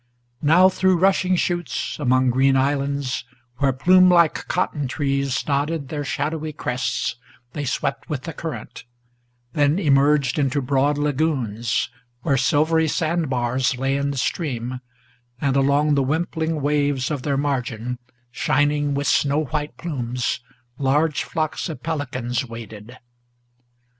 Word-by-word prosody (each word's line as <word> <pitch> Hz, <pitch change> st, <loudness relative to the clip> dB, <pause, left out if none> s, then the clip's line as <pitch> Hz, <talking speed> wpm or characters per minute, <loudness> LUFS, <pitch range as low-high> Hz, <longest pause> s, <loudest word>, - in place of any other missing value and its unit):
Now 165 Hz, +5 st, +6 dB
through 190 Hz, -1 st, +2 dB
rushing 185 Hz, 0 st, +3 dB
chutes, 175 Hz, -7 st, -2 dB
among 130 Hz, -2 st, +3 dB
green 135 Hz, +2 st, +3 dB
islands, 140 Hz, -1 st, 0 dB, 0.3 s
where 140 Hz, +1 st, +2 dB
plumelike 180 Hz, +3 st, +4 dB
Cotton 150 Hz, -6 st, -1 dB
trees 140 Hz, -1 st, -1 dB
nodded 145 Hz, 0 st, -1 dB
their 150 Hz, -2 st, -3 dB
shadowy 155 Hz, +2 st, -3 dB
crests, 125 Hz, -3 st, -2 dB, 0.4 s
they 145 Hz, -2 st, -3 dB
swept 140 Hz, +1 st, -2 dB
with 145 Hz, -4 st, -3 dB
the 165 Hz, -, -6 dB
current, 160 Hz, 0 st, -7 dB, 0.7 s
Then 145 Hz, +2 st, +2 dB
emerged 140 Hz, -5 st, +3 dB
into 140 Hz, 0 st, +1 dB
broad 140 Hz, +2 st, +1 dB
lagoons, 130 Hz, -7 st, 0 dB, 0.3 s
where 140 Hz, -, +2 dB
silvery 155 Hz, +5 st, +2 dB
sand 165 Hz, 0 st, 0 dB
bars 125 Hz, +1 st, 0 dB
Lay 135 Hz, +2 st, 0 dB
in 140 Hz, 0 st, 0 dB
the 140 Hz, -, -3 dB
stream, 125 Hz, -4 st, -2 dB, 0.6 s
and 135 Hz, -1 st, 0 dB
along 140 Hz, +2 st, +3 dB
the 140 Hz, -, +3 dB
wimpling 160 Hz, +2 st, -1 dB
waves 145 Hz, -2 st, +1 dB
of 145 Hz, -4 st, -2 dB
their 140 Hz, 0 st, -1 dB
margin, 125 Hz, -4 st, -2 dB, 0.3 s
Shining 145 Hz, +3 st, +1 dB
with 140 Hz, 0 st, -1 dB
snow 145 Hz, +2 st, +2 dB
white 150 Hz, 0 st, -4 dB
plumes, 125 Hz, -8 st, -2 dB, 0.4 s
large 145 Hz, +3 st, +1 dB
flocks 155 Hz, +3 st, -2 dB
of 160 Hz, -, -7 dB
pelicans 130 Hz, -5 st, -2 dB
waded. 115 Hz, 0 st, -10 dB
140 Hz, 130 wpm, -22 LUFS, 130-155 Hz, 0.7 s, Now